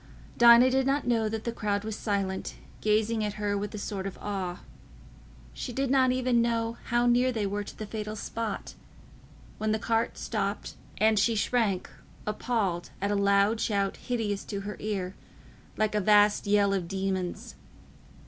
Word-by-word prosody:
Dinah 240 +2 +7
did 265 0 +2
not 275 0 +1
know 225 -3 +1
that 220 0 -4
the 235 - -2
crowd 205 -3 -1
was 220 -1 -4
silent, 195 -3 -2 0.3
gazing 215 +1 +1
at 210 -1 -2
her 205 -1 -1
with 205 0 -3
a - - -4
sort 195 -1 -4
of 195 - -7
awe—she 60 - -8
did 270 +1 -1
not 260 -2 +4
even 250 -2 +2
know 230 0 0
how 240 0 +2
near 245 +1 +4
they 220 -4 -1
were 205 +1 -2
to - - -11
the 215 - -5
fatal 215 0 -5
spot, 220 0 -4 0.9
when 215 0 +1
the - - +1
cart 225 +1 0
stopped, - - -3 0.2
and 215 0 +4
she 230 +2 +2
shrank 210 -3 +1 0.4
appalled 210 -5 -1
at 200 +1 -1
a - - +1
loud 200 +2 +3
shout 200 -2 0
hideous 220 -5 -2
to 200 -2 -4
her 210 +1 -5
ear, 195 -3 -3 0.6
like 215 -1 +1
a 210 - +1
vast 210 +1 +4
yell 200 -1 +3
of 185 -3 -1
demons. 190 -1 -3
210 Hz, 165 wpm, -28 LUFS, 200-230 Hz, 0.9 s, Dinah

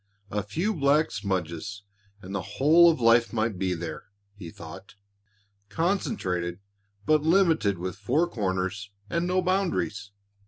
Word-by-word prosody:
"A 105 - -1
few 165 - -2
black 150 -1 +2
smudges 95 +1 -3 0.4
and 95 +1 -8
the 100 - -1 0.2
whole 165 +5 +7
of 160 - +1
life 115 0 +4
might 110 -4 -1
be 95 -2 0
there," 85 0 -6 0.3
he 100 -5 -9
thought, 90 +5 -11 0.7
"concentrated 95 - -1 0.5
but 155 -1 +4
limited 160 - +3
with 90 +1 -5
four 150 - +1
corners 100 - -2 0.2
and 170 +1 0
no 185 0 +1
boundaries." 185 - -1
105 Hz, 130 wpm, -26 LUFS, -, 0.7 s, whole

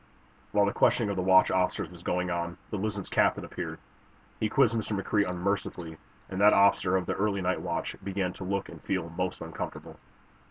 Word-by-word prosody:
While 105 0 +4
the 100 - 0
questioning 110 -4 +3
of - - -2
the 95 - 0
watch 95 0 +5
officers 95 0 0
was 90 -1 -12
going 90 0 -1
on 85 0 -3
the 105 - -2
"Luzon's" 100 -1 -3
captain - - +2
appeared. - - -5 0.6
He 110 - 0
quizzed 115 +2 +4
Mr. 110 -2 -1
McCrea 100 0 +1
unmercifully, 90 -3 -3 0.3
and 95 +1 -4
that 105 +1 +7
officer 100 -2 +4
of 95 - -2
the - - -1
early 100 -1 0
night 95 +1 0
watch 85 -2 -3
began 95 -2 -2
to - - -8
look 100 +1 -2
and - - -11
feel 90 -4 -2
most 90 +2 -3
uncomfortable. 80 0 -7
95 Hz, 195 wpm, -29 LUFS, 90-100 Hz, 0.6 s, that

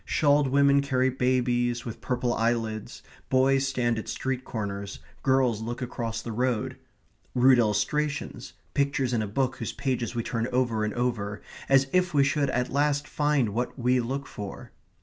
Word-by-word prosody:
Shawled 145 -1 +3
women 140 +1 +4
carry 130 -2 +1
babies 120 -1 +1
with 115 -2 -7
purple 125 -1 -1
eyelids; 115 -2 -2 0.3
boys 135 +1 +3
stand 120 -3 0
at - - -7
street 130 -1 -2
corners; 100 -4 -5 0.2
girls 130 -5 +2
look 120 +2 -4
across 115 -2 -4
the 115 - -5
road 120 0 -1 0.6
rude 130 0 +6
illustrations, 125 +5 -1 0.2
pictures 140 -3 +1
in 115 - +1
a 105 - -2
book 130 +4 -1
whose 115 - -4
pages 125 -3 -2
we 115 - -1
turn 115 0 -2
over 120 -4 +1
and 105 - -2
over 110 -4 -2 0.3
as 135 0 +5
if 180 -3 +2
we 140 - +6
should 140 +1 +1
at 125 0 -1
last 145 0 +1
find 145 -6 +1
what 120 +6 -3
we 125 0 +2
look 135 +4 -3
for. 100 -6 -8
125 Hz, 165 wpm, -27 LUFS, 115-135 Hz, 0.6 s, rude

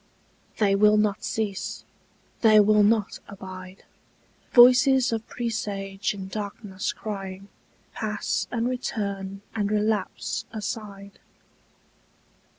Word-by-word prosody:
They 200 -2 +3
will 210 +1 +5
not 210 -1 +1
cease, 205 -3 -3 0.6
they 215 -2 +7
will 210 0 +5
not 210 0 +2
abide: 185 -1 -10 0.7
Voices 255 +1 +6
of 225 0 -3
presage 205 -4 -3
in 190 -1 -7
darkness 200 -1 -4
crying 195 -2 -7 0.4
Pass 210 -3 -2
and 235 0 -1
return 200 -6 -4
and 210 -2 -1
relapse 210 -2 -1
aside. 205 -2 -6
210 Hz, 95 wpm, -25 LUFS, 195-220 Hz, 0.7 s, they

